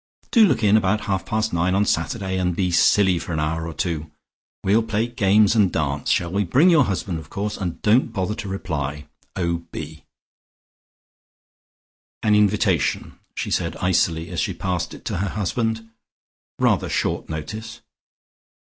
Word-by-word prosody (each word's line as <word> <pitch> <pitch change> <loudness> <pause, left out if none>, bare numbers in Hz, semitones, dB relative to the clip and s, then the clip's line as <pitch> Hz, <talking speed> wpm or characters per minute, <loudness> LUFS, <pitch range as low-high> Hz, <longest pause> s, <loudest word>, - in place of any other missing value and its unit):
"Do 225 -3 +6
look 140 - 0
in 105 +1 +5
about 105 +1 +1
half 95 -2 -2
past 110 -1 -1
nine 90 +2 +1
on 100 +1 +2
Saturday 95 +2 -1
and 90 -2 0
be 90 -1 0
silly 90 +1 +4
for 85 - -5
an 80 - -1
hour 80 +2 -2
or 85 - -6
two. 80 -2 -3 0.5
We'll 105 +4 +3
play 110 0 -1
games 105 -3 +3
and 100 -5 +4
dance, 75 -2 -2
shall 85 -1 +1
we? 100 +1 +1
Bring 140 - +4
your 155 -6 +5
husband 95 -3 -3
of 80 -1 -13
course, 105 +1 -3
and 90 -4 -4
don't 115 +3 +3
bother 100 -1 -2
to 105 -1 -6
reply. 75 -6 -4 0.3
"O.B." 85 -3 -4 2.2
"An 105 - +3
invitation," 100 -6 +1 0.2
she - - -3
said - - -1
icily, 85 -2 0
as - - -3
she - - -1
passed 90 -2 -3
it - - -15
to - - -2
her 100 +2 -1
husband. 110 +3 -2 0.7
"Rather - - +2
short - - -1
notice." 105 +9 -6
95 Hz, 160 wpm, -22 LUFS, 85-105 Hz, 2.2 s, Do